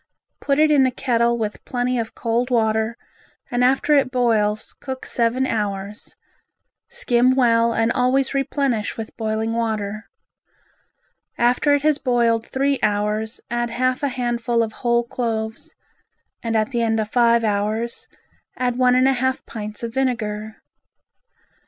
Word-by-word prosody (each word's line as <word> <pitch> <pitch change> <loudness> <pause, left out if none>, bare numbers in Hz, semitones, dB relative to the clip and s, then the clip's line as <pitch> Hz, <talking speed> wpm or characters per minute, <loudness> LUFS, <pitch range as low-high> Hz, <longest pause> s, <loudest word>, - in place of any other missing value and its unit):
Put 275 -1 0
it 310 0 +4
in 275 -3 +5
a - - -1
kettle 235 -2 +1
with 215 -2 -4
plenty 245 0 -1
of 225 -1 -5
cold 235 +2 -1
water 220 -1 +1 0.5
and 245 0 +1
after 270 +4 +3
it 275 -3 +4
boils 220 -4 0
cook 260 -1 -7
seven 240 +2 0
hours, 205 -3 -4 0.7
skim 255 - +2
well 235 -2 +3
and 225 0 +1
always 260 +3 +1
replenish 275 -5 -1
with 225 -1 -7
boiling 220 0 -2
water. 215 -2 -3 1.3
After 250 +5 +3
it 285 - -2
has 305 -1 +2
boiled 235 -3 +1
three 275 +1 0
hours 210 +1 -1
add 240 0 -1
half 255 +3 0
a 285 - +1
handful 240 -2 0
of 220 - -4
whole 235 -1 +2
cloves 235 +5 -4 0.7
and 230 -1 -2
at 215 +3 0
the 240 -2 0
end 225 -1 +1
of 215 0 -3
five 235 -1 +4
hours 215 +2 -2 0.5
add 250 -1 -1
one 250 -1 +4
and 255 +1 +4
a 270 - +4
half 260 +1 -1
pints 210 0 -6
of 230 -1 -4
vinegar. 220 -5 -2
235 Hz, 145 wpm, -21 LUFS, 220-255 Hz, 1.3 s, in